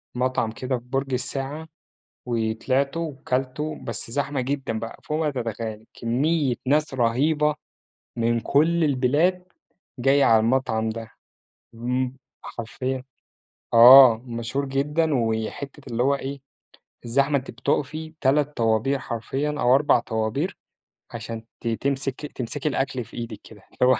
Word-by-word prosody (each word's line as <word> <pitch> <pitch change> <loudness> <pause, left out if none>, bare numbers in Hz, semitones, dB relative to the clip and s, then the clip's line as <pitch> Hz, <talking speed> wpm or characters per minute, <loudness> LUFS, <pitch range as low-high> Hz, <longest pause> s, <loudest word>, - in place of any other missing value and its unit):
مطعم 125 -3 0
كده 130 +2 -2
في 120 - -12
برج 135 +1 -2
الساعة، 135 +5 -3 0.6
وطلعته 125 +6 0
وكلته، 140 -1 -3
بس 115 0 -4
زحمة 140 +1 -1
جدًا 130 -4 -2
بقى 115 0 -7
فوق 155 +1 -2
ما 155 -2 +1
تتخيّلي، 115 -3 -5
كمّية 135 +3 +1
ناس 150 +1 +2
رهيبة 145 +6 +2 0.6
من 115 0 +1
كل 160 +7 +2
البلاد 150 +7 +2 0.6
جاية 135 +2 +4
على 110 -1 +6
المطعم 110 -1 +1
ده، 115 0 -6 0.6
إمم، 125 +2 -2 0.3
حرفيًا 130 +3 -4 0.7
آه، 125 0 +10
مشهور 120 +4 -3
جدًا 150 +4 0
وي 110 -3 0
حتة 140 -1 -9
اللي 115 - +1
هو 140 +2 +3
إيه 140 0 -5 0.7
الزحمة 140 +4 +2
أنتِ 130 - -6
بتُقفي 145 +5 -2
3 145 +2 +2
طوابير 115 +4 +2
حرفيًا 130 +5 -3
أو 150 - -3
4 125 -2 +4
أربع 140 -3 +4
طوابير 115 - -2 0.5
عشان 115 -1 -6 0.2
ت - - -3
تمسك 135 +4 -2
تمسكي 140 +2 -3
الأكل 135 -3 -2
في - - -14
إيدِك 115 -3 -6
كده، 105 -3 -14
اللي 125 - +3
هو - - +4
130 Hz, 135 wpm, -24 LUFS, 115-140 Hz, 0.7 s, آه